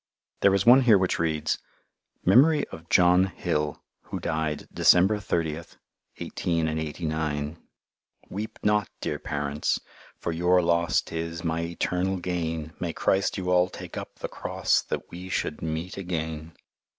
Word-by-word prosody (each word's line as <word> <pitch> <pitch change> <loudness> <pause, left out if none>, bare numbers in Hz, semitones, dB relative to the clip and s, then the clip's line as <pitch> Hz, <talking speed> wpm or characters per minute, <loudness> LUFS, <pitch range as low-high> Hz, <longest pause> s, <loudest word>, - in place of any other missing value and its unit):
There 100 -1 +5
is 100 - +1
one 125 +3 +8
here 115 -5 +6
which 95 -1 0
reads: 80 -2 0 0.7
Memory 145 - +5
of 80 0 -11
John 90 +1 +5
Hill 75 -5 -2 0.2
who - - -5
Died 80 -2 -2
December 95 +4 +5
30th. 85 -4 -3 0.4
1889 80 -2 -2 0.7
Weep 110 +3 -5
not, 105 -1 +2
dear 75 - -3
Parents, 75 -2 -1 0.4
For 85 - -3
your 90 +2 +3
loss 85 0 +2
'tis 85 +1 -5
My 80 -1 -1
etarnal 95 +2 0
gain 80 -3 -3
May 85 -2 -2
Christ 95 +1 +1
you 90 -1 -2
all 90 0 +4
take - - -9
up - - -7
the - - -5
Cross - - 0
that - - -4
we 90 +2 -8
Should 75 - -2
meat 80 +4 -4
again. 80 -3 -4
85 Hz, 140 wpm, -26 LUFS, 80-95 Hz, 0.7 s, one